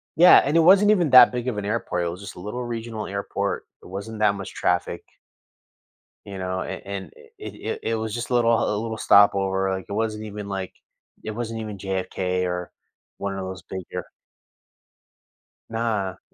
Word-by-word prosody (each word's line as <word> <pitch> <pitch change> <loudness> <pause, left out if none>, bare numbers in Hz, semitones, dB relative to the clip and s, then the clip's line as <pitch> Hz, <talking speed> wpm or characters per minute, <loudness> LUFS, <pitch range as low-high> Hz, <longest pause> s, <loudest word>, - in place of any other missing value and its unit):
Yeah, 175 +2 +9
and 150 +4 +1
it - - +6
wasn't 195 +5 +6
even 175 -8 +2
that 130 - +9
big 125 0 -4
of 115 -5 -1
an 100 - -3
airport, 100 -5 -1
it - - -1
was 90 +3 -7
just 100 - -9
a - - -10
little 105 +6 -5
regional 115 -2 -5
airport, 100 0 -3 0.2
it - - -14
wasn't 100 +4 -7
that 105 -1 +3
much 95 - -7
traffic. 90 0 -1 1.2
You 100 -1 -7
know? 95 0 -3
And - - -6
and 95 -4 -6 0.2
it - - -8
it - - -4
it 115 - 0
was 110 -1 -3
just 120 +1 -4
a - - -2
little 115 -1 +4
a 105 - 0
little 110 -1 -4
stopover, 95 -2 +4
like, 95 -1 -5
it 100 - -6
wasn't 110 0 -2
even, 105 -1 -7
like 95 -2 -4 0.5
it 110 - -4
wasn't 115 0 -4
even 105 -2 -6
JFK 95 -1 -2
or 90 0 -3 0.5
one 100 0 -3
of - - -4
those 95 -2 -7
bigger 95 -3 -6 1.6
Nah. 110 -5 -2
100 Hz, 185 wpm, -24 LUFS, 95-115 Hz, 1.6 s, Yeah